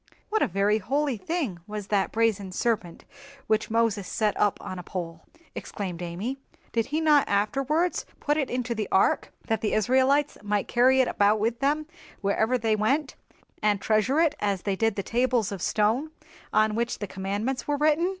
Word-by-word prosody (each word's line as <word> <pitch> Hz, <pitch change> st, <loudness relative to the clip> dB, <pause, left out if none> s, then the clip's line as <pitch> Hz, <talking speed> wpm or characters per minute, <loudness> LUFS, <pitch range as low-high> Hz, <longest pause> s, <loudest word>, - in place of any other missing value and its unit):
"What 435 Hz, 0 st, +1 dB
a -, -, +3 dB
very 200 Hz, +3 st, +1 dB
holy 275 Hz, +5 st, 0 dB
thing 245 Hz, -, -3 dB
was 210 Hz, -1 st, -6 dB
that 200 Hz, -2 st, +1 dB
brazen 215 Hz, -4 st, 0 dB
serpent 195 Hz, -4 st, -2 dB, 0.4 s
which 215 Hz, 0 st, 0 dB
Moses 220 Hz, -4 st, +1 dB
set 215 Hz, -2 st, 0 dB
up 205 Hz, -, +2 dB
on 185 Hz, -, -6 dB
a -, -, -5 dB
pole!" 170 Hz, -2 st, -6 dB, 0.3 s
exclaimed 180 Hz, -4 st, -5 dB
Amy. 190 Hz, +10 st, -4 dB, 0.3 s
"Did 230 Hz, -1 st, 0 dB
he 300 Hz, +3 st, -1 dB
not 300 Hz, -3 st, +4 dB
afterwards 275 Hz, -, 0 dB
put 295 Hz, -, +1 dB
it 280 Hz, -4 st, -1 dB
into 250 Hz, -1 st, -2 dB
the 215 Hz, -2 st, -3 dB
ark, 190 Hz, -, +2 dB
that 225 Hz, -1 st, -1 dB
the 215 Hz, -, 0 dB
Israelites 260 Hz, +6 st, +2 dB
might 205 Hz, -1 st, -1 dB
carry 260 Hz, +2 st, +4 dB
it 255 Hz, -, +1 dB
about 205 Hz, +1 st, +2 dB
with 230 Hz, +2 st, 0 dB
them 295 Hz, +3 st, +1 dB, 0.3 s
wherever 220 Hz, +4 st, +1 dB
they 220 Hz, -2 st, +1 dB
went, 270 Hz, +7 st, 0 dB, 0.5 s
and 210 Hz, -1 st, +2 dB
treasure 215 Hz, +8 st, +2 dB
it 325 Hz, -3 st, +3 dB
as 200 Hz, -3 st, -1 dB
they 200 Hz, -2 st, 0 dB
did 225 Hz, +1 st, +1 dB
the 200 Hz, -, -2 dB
tables 240 Hz, -2 st, +1 dB
of 195 Hz, -3 st, -5 dB
stone 225 Hz, +8 st, +1 dB, 0.4 s
on 215 Hz, 0 st, +3 dB
which 235 Hz, +2 st, -1 dB
the 205 Hz, -, -4 dB
Commandments 205 Hz, +7 st, -3 dB
were 290 Hz, -1 st, +1 dB
written?" 310 Hz, +4 st, +3 dB
220 Hz, 180 wpm, -26 LUFS, 205-265 Hz, 0.5 s, not